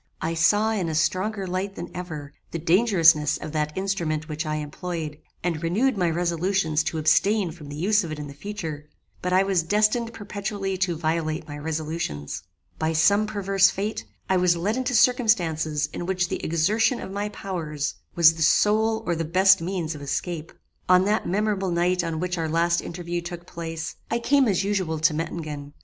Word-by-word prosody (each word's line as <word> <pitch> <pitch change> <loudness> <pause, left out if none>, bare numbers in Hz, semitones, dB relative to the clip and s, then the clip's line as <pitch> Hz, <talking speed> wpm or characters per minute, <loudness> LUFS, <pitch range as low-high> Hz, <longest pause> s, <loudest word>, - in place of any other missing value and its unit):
"I 165 - -2
saw 205 +7 +3
in 190 -6 -1
a 160 - -2
stronger 190 +5 0
light 190 +2 -3
than 175 - -7
ever, 155 -5 -6 0.2
the - - -4
dangerousness 165 -4 +4
of 155 - -7
that 150 0 -2
instrument 170 -5 -1
which 155 0 -4
I 155 - -1
employed, 155 0 -5 0.2
and 165 -3 -1
renewed 215 +10 +1
my 180 -4 +1
resolutions 170 -1 +1
to 160 - -2
abstain 195 +4 +2
from 155 -3 -11
the 145 - -6
use 205 +6 +2
of 165 - -5
it 155 - -4
in 145 -1 -7
future; 155 -4 -6 0.3
but 180 - -2
I 185 +1 +5
was 195 -3 +2
destined 215 +6 +1
perpetually 200 -2 -4
to 180 -3 0
violate 160 -1 -1
my 145 - -7
resolutions. 150 - -4 0.4
By 160 +1 0
some 200 +7 +4
perverse 195 -2 +3
fate, 210 +3 -3 0.2
I 190 - +2
was 180 -1 +3
led 200 +6 0
into 255 0 -1
circumstances 170 - +2
in 175 - -5
which 180 -2 0
the - - -4
exertion 215 +10 +2
of - - -7
my 205 +1 -2
powers 160 -8 -4 0.2
was 165 -1 +7
the 165 - -8
sole 220 +6 +3
or 175 - 0
the 165 - -2
best 190 +3 +5
means 170 -2 -2
of 150 - -9
escape. 155 +4 -3 0.4
"On 185 0 +6
that 210 +2 +1
memorable 200 0 0
night 175 +1 +1
on 165 -2 -3
which 180 0 -2
our 160 -1 -1
last 170 +1 +2
interview 175 0 -4
took 175 0 -7
place, 165 -2 -6
I 235 - +1
came 270 +2 +3
as 195 -2 +1
usual 190 -5 -1
to 155 0 +3
Mettingen. 150 -3 -5
175 Hz, 185 wpm, -25 LUFS, 160-195 Hz, 0.4 s, was